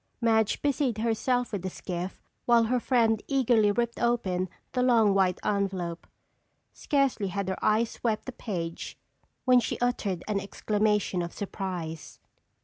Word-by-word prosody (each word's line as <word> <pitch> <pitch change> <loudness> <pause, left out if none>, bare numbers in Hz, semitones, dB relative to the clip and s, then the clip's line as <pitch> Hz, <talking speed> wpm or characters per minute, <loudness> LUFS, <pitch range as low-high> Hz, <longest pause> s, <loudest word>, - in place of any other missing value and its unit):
Madge 220 -2 +2
busied 275 -5 +1
herself 235 +2 0
with 200 -4 -3
the 185 - -3
skiff 180 +1 -6 0.2
while 235 -1 +6
her 245 +3 +1
friend 225 -3 +2
eagerly 240 -6 +3
ripped 235 +2 -1
open 190 -7 0 0.2
the 250 - 0
long 230 -5 +4
white 190 -2 +2
envelope. 190 -4 -2 0.7
Scarcely 275 -8 0
had 195 +1 -3
her 190 - -4
eyes 220 +2 +2
swept 220 -3 -2
the 260 - -5
page 170 -9 -5 0.5
when 255 -1 +6
she 235 - -2
uttered 210 -7 -1
an 210 -2 0
exclamation 210 -1 0
of 170 0 -5
surprise. 180 -6 -5
215 Hz, 145 wpm, -28 LUFS, 190-240 Hz, 0.7 s, while